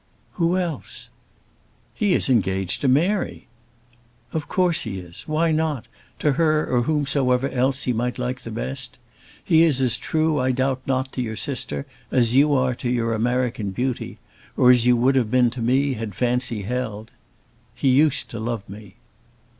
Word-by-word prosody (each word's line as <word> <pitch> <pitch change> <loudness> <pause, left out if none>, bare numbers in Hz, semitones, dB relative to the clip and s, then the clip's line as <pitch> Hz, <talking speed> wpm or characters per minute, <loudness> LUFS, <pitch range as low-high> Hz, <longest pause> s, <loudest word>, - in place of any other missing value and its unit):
"Who 175 +1 +1
else?" 170 -6 -5 0.8
"He 205 -3 +1
is - - +1
engaged 95 -6 +1
to 140 - +1
Mary." 175 +10 +1 0.9
"Of 155 -2 -3
course 180 -1 +1
he 105 -5 -4
is. 90 -2 -9
Why 160 +2 +1
not; 155 -5 -1 0.3
to 150 - +1
her 155 +1 +2
or 125 -1 +1
whomsoever 135 -2 +1
else 130 +1 0
he 125 - 0
might 120 +2 -2
like 125 0 -3
best? 65 +3 -5 0.5
He 160 - +4
is 155 -6 +4
as 130 -3 +3
true 155 -1 0
I 130 0 +1
doubt 130 +1 0
not 130 0 -1
to 125 - -3
your 110 -2 -3
sister 140 +2 -3 0.2
as 120 -3 +2
you 145 +3 +5
are 130 -1 +2
to 120 0 -4
your 115 -2 0
American 120 -2 -1
beauty, 125 +6 -3 0.4
or 125 0 +6
as 125 -1 +3
you 125 -1 +5
would 130 +3 +3
have 120 -5 +2
been 125 0 +3
to 125 0 -6
me 135 +4 +2
had 110 -4 -6
fancy 125 -3 0
held. 110 -1 -4 0.6
He 135 - +1
used 145 +2 +3
to 115 - -5
love 110 -2 -4
me." 100 -1 -12
125 Hz, 170 wpm, -23 LUFS, 115-145 Hz, 0.9 s, or